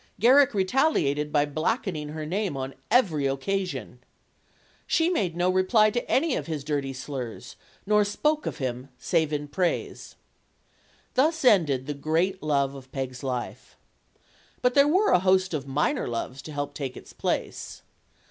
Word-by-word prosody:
Garrick 260 +2 +5
re 190 -2 +2
taliated 150 - +1
by 145 -1 +3
blackening 155 - -2
her 155 0 -5
name 185 -2 -2
on 135 0 -4 0.2
every 175 - +3
occasion. 180 +8 -3 0.9
She 335 +1 +2
made 185 - 0
no 175 +1 +2
reply 185 +4 +4
to 240 +2 -3
any 290 +2 +2
of - - -4
his 155 -4 -4
dirty 140 -2 -2
slurs; 130 -3 -6 0.3
nor 210 +1 +4
spoke 300 +9 0
of - - -4
him 130 0 -4
save 155 +4 0
in 150 -1 -2
praise. 175 +4 -2 1.0
Thus 315 +3 +2
ended 155 - +4
the 145 - -3
great 165 +6 0
love 140 -3 +1
of 135 -1 -12
Peg's 130 -2 -5
life. 125 -3 -5 0.9
But 250 0 +3
there 280 +1 +5
were 380 +7 +3
a - - +5
host 185 0 +2
of 140 -3 -3
minor 150 - 0
loves 125 +3 -4
to 155 - -9
help 145 -1 -4
take 135 -3 -5
its - - -12
place. - - -3
160 Hz, 155 wpm, -26 LUFS, 140-210 Hz, 1.0 s, Garrick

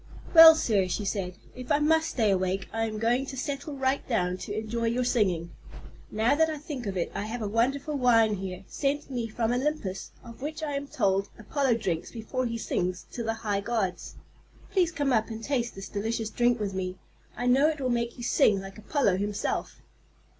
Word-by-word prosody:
"Well 325 -1 +11
sir," 205 -11 +1
she 205 +3 -2
said, 190 -3 -2 0.2
"if 255 -1 -7
I - - +5
must 320 +2 +2
stay 220 -5 +2
awake, 190 0 0
I 225 0 0
am 215 -1 -5
going 240 +5 +1
to 265 - -6
settle 280 +2 -4
right 265 +1 +1
down 180 -7 0
to 205 +3 -5
enjoy 225 +2 -2
your 240 +2 +1
singing. 185 -9 +1 0.6
Now 220 +5 +2
that 320 +2 +3
I 310 - -3
think 280 -6 -6
of 195 -1 -3
it, 170 - -1
I 205 - -3
have 225 +1 -4
a - - -1
wonderful 265 +7 0
wine 225 -4 +4
here, 185 0 -6
sent 285 0 -2
me 240 -3 -2
from 225 +1 -1
Olympus, 245 -7 -2 0.2
of 230 +1 -12
which 310 +2 -5
I 300 - -2
am 280 0 -3
told 195 -6 0
Apollo 250 +3 0
drinks 180 -8 -2
before 245 +3 -3
he 230 0 -3
sings 185 -4 -2
to 240 - -5
the 225 -1 -1
high 200 -1 0
gods. 205 -4 -2 0.6
Please 360 -4 +2
come 285 -6 0
up 220 -2 +2
and 225 0 -6
taste 245 -4 -1
this 195 0 -7
delicious 220 +1 -2
drink 240 +1 +2
with 200 -2 -2
me. 185 -1 -3 0.4
I 245 - -2
know 265 +4 +5
it 310 -1 -3
will 260 -2 -1
make 235 +1 -1
you 240 - -7
sing 225 -5 +3
like 195 +1 -9
Apollo 215 -4 +1
himself." 205 +1 -3
230 Hz, 205 wpm, -28 LUFS, 200-270 Hz, 0.6 s, Well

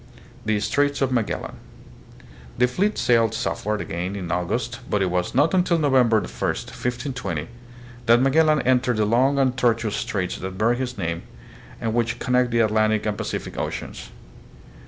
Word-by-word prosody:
The 105 -1 +1
Straits 145 +7 +1
of 130 - 0
Magellan. 115 -4 -2 1.0
The 125 +1 +4
fleet 195 +12 0
sailed 115 -2 +3
south 110 - -3
ward 105 -1 0
again 90 +4 -4
in 90 -4 -5
August 110 +8 -2
but 105 -2 +1
it 90 - 0
was 90 +3 -1
not 145 +6 +3
until 180 -2 +3
November 130 -7 +3
1, - - -5
1520, 120 - -3 0.6
that 115 +1 +6
Magellan 150 +3 +3
entered 125 -2 +2
the 105 - +2
long 130 +6 +3
and 130 -2 +2
tortuous 115 -4 +1
straits 100 -7 -2
that 95 0 -6
bear 110 +4 +3
his 125 0 -4
name 85 -3 -2 0.6
and 115 -1 -2
which 120 0 0
connect 125 0 +1
the 115 0 +2
Atlantic 110 -1 +2
and 105 -1 0
Pacific 105 0 -4
oceans. - - -5
115 Hz, 160 wpm, -23 LUFS, 105-130 Hz, 1.0 s, that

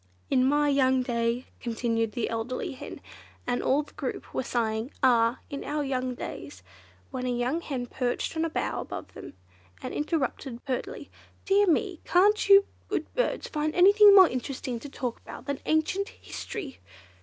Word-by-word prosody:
"In 255 - +4
my 290 +3 +3
young 260 -2 +3
day," 235 0 -1
continued 230 -2 -1
the 240 - -1
elderly 230 +3 -3
hen, 260 - -9 0.4
and 245 0 0
all 285 +3 +2
the - - -19
group - - -5
were - - 0
sighing, 225 -1 -1
"Ah! 235 -1 +4
in 280 - -4
our 295 0 -2
young 255 -2 -2
days!" - - -8 0.5
when 255 -1 -3
a - - 0
young 245 +7 0
hen 260 -6 -4
perched 245 +4 -2
on 320 - 0
a 330 - 0
bough 320 - -2
above - - -8
them, - - -10 0.4
and - - -6
interrupted 270 -5 -2
pertly, 260 -3 -4 0.3
"Dear 405 +1 +4
me, 350 +1 +1
can't 405 +3 +3
you 400 0 +8 0.2
good - - -3
birds - - -1
find 305 0 -2
anything 405 +3 +8
more 380 -2 +9
interesting 255 -2 -4
to 285 - -9
talk 250 -3 -4
about - - -11
than 280 -1 -3
ancient 315 +6 +1
history?" 335 - -7
265 Hz, 165 wpm, -27 LUFS, 245-320 Hz, 0.5 s, more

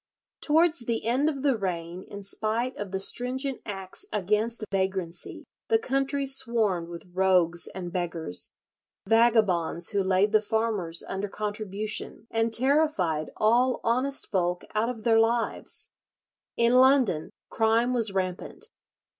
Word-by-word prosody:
Towards 320 +2 +3
the 235 -2 -3
end 260 +6 +2
of 280 -3 -5
the 275 -3 +3
reign, 180 -3 -4
in 200 0 -9
spite 225 +5 -2
of 205 -1 -6
the 190 0 -3
stringent 255 +6 -1
acts 195 -3 -6
against 215 +3 -1
vagrancy, 190 -3 -3 0.2
the 450 - +4
country 275 - -1
swarmed 230 -10 +3
with 170 +1 -9
rogues 180 -2 +2
and 175 -2 -7
beggars—vagabonds 175 - 0
who 200 -2 +1
laid 190 +2 +2
the 215 -1 +4
farmers 215 -6 -2
under 195 +1 -4
contribution, 210 +1 -4
and 225 0 0
terrified 235 - +1
all 240 +4 +2
honest 255 +4 0
folk 180 -2 0
out 220 +2 0
of 230 -3 -6
their 225 -2 +4
lives. 230 +1 -1 0.7
In 235 +1 +3
London 255 - +4 0.2
crime 230 +2 +2
was 230 -4 +6
rampant. 190 - -4
215 Hz, 130 wpm, -26 LUFS, 185-245 Hz, 0.7 s, was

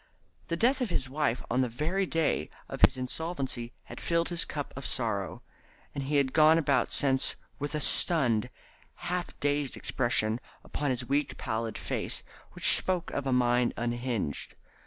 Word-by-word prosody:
The 170 - -2
death 255 +7 +2
of 245 - 0
his 130 -6 -1
wife 135 -3 -1
on 125 +2 +2
the 125 - 0
very 165 +11 -1
day 165 -1 0 0.2
of - - -7
his 130 - +6
insolvency 130 -3 -3
had - - -10
filled 170 0 0
his 175 -2 +2
cup 145 -2 -5
of 140 - -7
sorrow, 105 -7 -2 0.5
and 140 -1 -4
he 145 +2 -1
had 140 -2 +2
gone 155 +2 +6
about 140 -4 +1
since 135 -1 +2 0.2
with 145 +1 -3
a - - 0
stunned, 125 -10 +5 0.6
half 180 -1 -4
dazed 145 -1 -1
expression 120 -3 0 0.2
upon 145 -1 -3
his 125 -1 -2
weak 140 +2 -1
pallid 110 0 -3
face - - -3 0.3
which - - +5
spoke 180 -2 0
of 140 -1 -3
a - - 0
mind 125 -1 +2
unhinged. 120 - -3
140 Hz, 165 wpm, -29 LUFS, 120-155 Hz, 0.6 s, his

